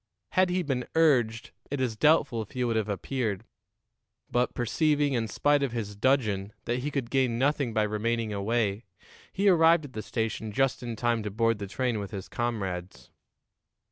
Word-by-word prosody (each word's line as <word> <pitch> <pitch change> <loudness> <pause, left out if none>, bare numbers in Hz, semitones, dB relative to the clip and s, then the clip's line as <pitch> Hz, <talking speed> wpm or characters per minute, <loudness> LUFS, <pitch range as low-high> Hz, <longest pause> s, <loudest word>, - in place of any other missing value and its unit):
Had 185 0 +3
he 180 0 0
been 130 -4 -2
urged, 125 -9 +2 0.2
it 145 - -3
is 125 -4 -1
doubtful 150 -3 +3
if 110 - -9
he 125 -1 -1
would 115 -2 0
have 110 -1 0
appeared; 105 0 -2 0.9
but, 125 +1 +1
perceiving, 145 +4 +1
in 115 -3 0
spite 145 +6 +2
of 135 -4 -1
his 105 -3 -4
dudgeon, 105 -4 +1
that 120 +1 -1
he 140 +4 -2
could 135 -5 -3
gain 130 -4 +2
nothing 140 -1 +1
by 110 -1 +1
remaining 110 +1 -1
away, 105 +1 0 0.5
he 200 +2 0
arrived 165 -3 +5
at 135 - -11
the 110 - -4
station 110 -1 -3
just 135 +5 +1
in 120 -2 -4
time 120 0 0
to 105 - -3
board 115 +1 +1
the 100 - -5
train 120 +2 -1
with 100 -1 -5
his 95 -2 -6
comrades. 95 - -4
120 Hz, 180 wpm, -28 LUFS, 110-135 Hz, 0.9 s, arrived